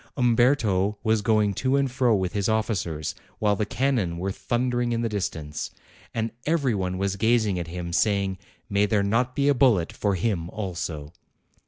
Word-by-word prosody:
Umberto 115 -5 +2
was 110 -1 +2
going 105 -1 +2
to 130 +7 0
and 140 -2 +1
fro 125 -3 +3
with 95 -2 -1
his 100 0 0
officers, 95 -9 -1 0.2
while 105 -1 +2
the 105 0 -1
cannon 120 -12 0
were 95 +3 -2
thundering 120 +3 -1
in 115 - 0
the 115 - 0
distance; 80 -8 -3 0.4
and 115 0 -2 0.2
every 145 -6 +2
one 95 -2 -2
was 100 0 -1
gazing 110 -3 +2
at 85 - -4
him 90 +1 -5
and 85 0 -3
saying, 100 -3 +1 0.3
'May 100 +1 +2
there 105 -1 +2
not 120 +5 +1
be 140 0 +2
a 145 - +5
bullet 120 -11 +3
for 100 -2 0
him 90 -4 -1
also 85 -7 -5
105 Hz, 180 wpm, -25 LUFS, 95-120 Hz, 0.4 s, a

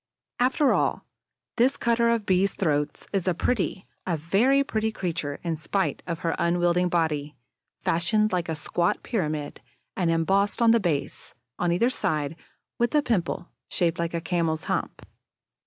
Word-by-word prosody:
After 260 +3 +3
all, - - 0 0.5
this 255 +4 +3
cutter 235 0 +2
of 230 -3 +1
Bees' 190 +1 +2
throats 150 -4 -1
is 195 -2 0
a 180 - +2
pretty, 195 -2 -1 0.2
a 170 -3 0
very 220 - +3
pretty 220 -4 -1
creature, 165 -8 -3
in 170 -2 -1
spite 190 +5 -1
of 170 -2 -3
her 165 - 0
unwieldy 175 +1 +2
body 155 -4 0 0.5
fashioned 215 +6 +2
like 175 -2 -1
a 160 - -1
squat 170 +3 -1
pyramid 155 - -3 0.3
and 175 -3 +1
embossed 190 +5 +2
on 230 -1 +5
the 230 - +5
base, 165 -8 -3 0.2
on 175 -1 +1
either 230 +9 +2
side, 150 - -1 0.4
with 240 +5 +1
a 295 - +4
pimple 185 -7 -1 0.2
shaped 170 -1 0
like 170 0 -1
a 165 - -1
camel's 165 -2 -1
hump. - - -3
175 Hz, 155 wpm, -26 LUFS, 165-215 Hz, 0.5 s, on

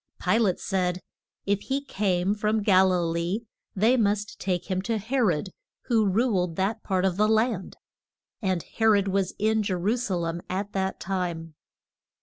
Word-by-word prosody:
Pi 220 - +2
late 200 -6 +1
said, 180 -2 -1 0.4
if 200 0 +1
he 275 +1 -2
came 190 -4 0
from 215 0 0
Gal 190 -2 +5
i 180 - +2
lee 170 +6 -1 0.3
they 225 +6 +3
must 210 -2 0
take 180 -2 -1
him 185 -1 -1
to 225 +3 -1
He 235 +6 -2
rod, 190 -5 +1 0.4
who 225 -3 +3
ruled 190 -5 +1
that 200 +5 -1
part 190 -2 0
of 185 -1 0
the 210 +1 +3
land. 220 -3 0 0.6
And 185 -5 0
He 225 - -6
rod 205 -3 +4
was 195 -1 0
in 220 +1 +2
Je 195 -3 -1
ru 195 +6 +1
sa 210 -6 -2
lem 170 0 -2
at 195 +2 -3
that 190 0 -2
time. 175 -4 -3
195 Hz, 175 wpm, -26 LUFS, 185-215 Hz, 0.6 s, Gal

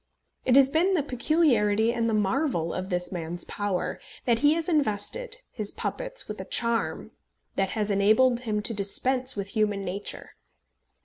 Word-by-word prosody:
It 255 - +4
has 270 0 +6
been 355 +5 +3
the 310 - +1
peculiarity 235 -6 +2
and 230 -1 0
the 220 - +1
marvel 210 - 0
of 185 +1 -4
this 180 -1 -2
man's 175 -1 -5
power, 205 -3 -3 0.2
that 235 -2 +2
he 290 +4 +4
has 330 -1 -2
invested 320 - -1
his 210 -2 -3
puppets - - -4
with - - -6
a - - -8
charm 225 - -1 0.4
that 195 -1 0
has 210 -1 0
enabled 220 +5 +4
him 215 -4 -2
to 230 - +1
dispense 250 +6 +2
with 200 -1 -4
human 205 -2 0
nature. 195 +3 -6
220 Hz, 165 wpm, -26 LUFS, 200-270 Hz, 0.4 s, has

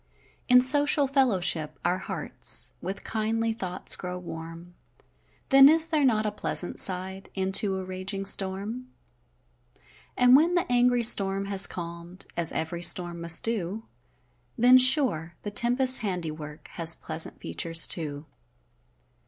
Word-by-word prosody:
In 250 0 +5
social 290 +3 +4
fellowship, 185 - -1
our 180 +1 -1
hearts - - +2
With 190 +3 -7
kindly 225 +1 -3
thoughts 185 -5 -1
grow 180 0 -7
warm; 165 0 -11 0.8
Then 270 0 +6
is 320 +1 +4
there 315 -3 -2
not 220 -5 0
a 210 - -2
pleasant 180 -3 -2
side, 190 +1 0
E'en 190 0 -3
to 195 0 +1
a 190 - -7
raging 185 +1 -6
storm? 200 +6 -2 1.3
And 250 0 +4
when 330 +5 +2
the 350 - 0
angry 245 0 +1
storm 195 -3 +3
has 195 -1 +2
calm'd, 170 +1 -7
As 170 -1 -1
ev'ry 165 +2 -5
storm 175 -1 +2
must 170 0 +3
do, 220 -2 -2 0.7
Then, 250 +2 +5
sure, 250 - +1
the 205 - -7
tempest's 250 +4 +2
handiwork, 160 -7 -7
Has 165 -1 +1
pleasant 160 0 -2
features, 165 -1 0
too. 150 -3 -4
195 Hz, 135 wpm, -25 LUFS, 170-245 Hz, 1.3 s, Then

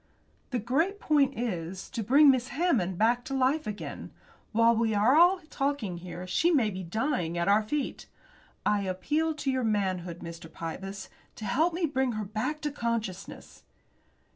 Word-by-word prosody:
"The 255 - -1
great 310 - 0
point 280 -5 +2
is 185 -6 -4
to 230 - -3
bring 275 +7 +6
Miss 255 -1 0
Hammond 250 - 0
back 235 +4 +2
to 270 - -3
life 270 +4 +1
again. 210 -1 -6 0.4
While 230 +1 +4
we 225 -1 +1
are 315 - +5
talking 270 -10 -2
here 175 +1 -7
she 310 - +2
may 255 -11 +3
be 190 0 -5
dying 180 - -1
at 170 - 0
our 205 +2 +5
feet. 270 +6 -3 0.6
I 210 -1 +2
appeal 295 +13 -1
to 280 -2 -1
your 260 -1 0
manhood, 185 -5 -1
Mr. 170 -1 -9
Pybus, 190 +5 -6 0.3
to 215 - -7
help 315 - +1
me 350 -1 +1
bring 265 -4 0
her 215 -1 -3
back 220 +10 -3
to 295 - -2
consciousness." 230 -7 -4
230 Hz, 165 wpm, -28 LUFS, 190-280 Hz, 0.6 s, bring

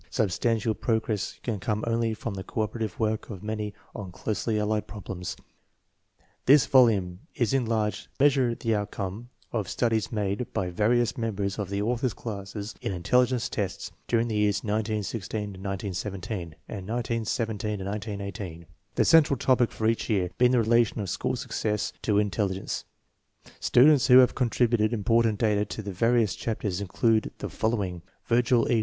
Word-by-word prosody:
Substantial 110 +1 +1
progress 110 -2 -1
can 110 -5 -2
come 105 +3 -2
only 115 -1 0
from 110 0 -5
the 95 -1 -5
cooperative 110 -2 -3
work 110 -1 -1
of 100 -4 -8
many 105 -1 -3 0.2
on 95 -3 -7
closely 110 +4 -2
allied 105 0 0
problems. 95 -3 -6 1.1
This 140 +1 +7
volume 100 -9 +4 0.2
is 120 -2 +1
in 130 -4 +1
large 110 -2 -1
measure 135 -4 +4
the 115 -1 -1
outcome 105 +2 -4 0.2
of 105 -6 -2
studies 110 -3 0
made 105 +1 -2
by 90 -2 -1
various 120 +6 +1
mem 115 -2 -1
bers 100 0 -2
of 100 -3 -3
the 100 +1 -1
author's 120 0 0
classes 100 -1 -6
in - - -2
intelligence 125 +7 +2
tests 100 -6 -3 0.2
during 115 0 +2
the 110 - -2
years 105 -1 +1
1916 110 -1 -2 0.6
17 95 -3 -5
and 95 -3 -7
1917 105 -3 -2
18, 95 -5 -6 0.3
the - - +3
central 155 -4 +5
topic 125 -1 +3
for 110 - -4
each 115 +2 +1
year 95 -5 +1
being 125 0 +6
the 125 - +3
relation 115 0 +3
of 100 -4 -3
school 95 - -1
success 105 -3 -2
to 105 - +1
intel 105 0 +1
ligence* 95 +1 -4 0.7
Students 135 +1 +5
who 125 -1 +8
have 130 -1 +7
contributed 120 -2 +2
important 115 0 +2
data 105 -2 +2
to 110 +2 -6
the 100 -1 -5
various 115 0 +2
chapters 105 -2 -3
include 110 +3 +1
the - - -5
following: 100 -6 -1 0.3
Virgil 120 0 +3
E. 115 - +4
110 Hz, 155 wpm, -27 LUFS, 100-115 Hz, 1.1 s, who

